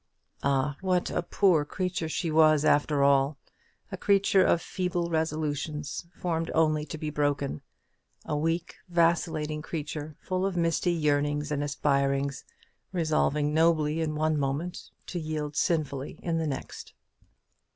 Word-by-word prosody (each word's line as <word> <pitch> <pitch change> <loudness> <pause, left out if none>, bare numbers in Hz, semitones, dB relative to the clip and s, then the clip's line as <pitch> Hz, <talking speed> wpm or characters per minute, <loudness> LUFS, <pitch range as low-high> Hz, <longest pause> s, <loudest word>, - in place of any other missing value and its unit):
Ah, 140 +1 +1
what 185 -2 +1
a - - 0
poor 175 -3 +3
creature 180 +1 -3
she 165 0 -2
was, 155 -1 +5
after 145 -1 +3
all! 140 +1 +3 0.5
a - - -4
creature 195 -1 +4
of 170 - +3
feeble 175 -1 -2
resolutions, 155 0 -2
formed 165 -2 -2
only 155 -1 +2
to 155 - -6
be 155 0 -4
broken; 145 - -1 0.6
a - - -2
weak 165 +3 -1
vacillating 165 -3 +1
creature, 155 -1 -5
full 185 0 -2
of 195 -2 -1
misty 170 +1 +1
yearnings 145 -2 0
and 145 -1 0
aspirings 140 -1 0 0.5
resolving 155 -4 +1
nobly 160 -1 +3
in 155 -1 -1
one 155 0 +1
moment, 145 +6 -3 0.2
to 175 - -4
yield 155 -2 -4
sinfully 145 -5 -1
in 165 -2 0
the 160 - -1
next. 135 -2 -6
155 Hz, 135 wpm, -28 LUFS, 145-170 Hz, 0.6 s, was